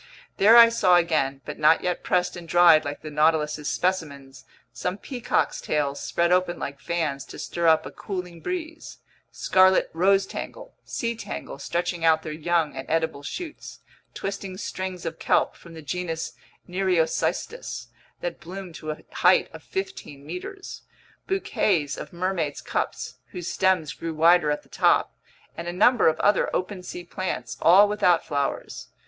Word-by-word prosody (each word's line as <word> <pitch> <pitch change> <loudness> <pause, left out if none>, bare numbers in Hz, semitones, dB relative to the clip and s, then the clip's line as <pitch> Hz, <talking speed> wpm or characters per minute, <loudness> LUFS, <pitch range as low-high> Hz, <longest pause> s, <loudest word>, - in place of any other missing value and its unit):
There 220 +4 +7
I 230 -1 +10
saw 190 -6 +4
again, 155 -6 +1
but 150 - -7
not 155 +1 +4
yet 180 -1 -1
pressed 180 0 +1
and 175 -1 -9
dried 170 -2 +6
like 145 +1 -5
the 155 - -7
Nautilus's 150 -1 +1
specimens, 140 -7 -3 0.3
some 180 +2 -3
peacock's 245 +1 -1
tails 145 -2 -1
spread 170 0 0
open 180 -1 +2
like 140 0 -6
fans 155 -3 -2
to - - -11
stir 170 -1 -2
up 160 -1 +4
a - - -7
cooling 180 -4 -6
breeze, 325 - -5 0.3
scarlet 185 0 +3
rosetangle, 195 - 0
sea 235 0 -3
tangle 220 - -7
stretching 170 +4 -2
out 160 -1 +4
their 155 - -5
young 165 0 0
and - - -7
edible 160 -3 0
shoots, 315 - -7 0.3
twisting 195 -1 -5
strings 185 -3 -5
of 165 0 -5
kelp - - +2
from 170 -1 -14
the 160 - -10
genus 165 -4 -4 0.3
Nereocystis 185 - -1 0.3
that - - -4
bloomed 185 +1 -8
to 155 - -6
a 155 - -3
height - - +4
of - - -10
fifteen 380 - -6
meters, 180 - -7 0.5
bouquets 190 - 0
of - - -8
mermaid's 175 -4 -2
cups - - -3 0.2
whose 175 -1 -4
stems 180 -6 +1
grew 165 -1 -5
wider 165 0 +5
at 150 - -1
the - - -25
top, - - +2 0.4
and 170 - -6
a - - -1
number 215 +7 +4
of 160 0 +2
other 205 -1 +3
open 185 +1 -3
sea 180 0 -7
plants, 125 -11 -4
all 190 +5 +7
without 200 -5 +2
flowers. 140 -1 -3
175 Hz, 155 wpm, -25 LUFS, 155-190 Hz, 0.5 s, I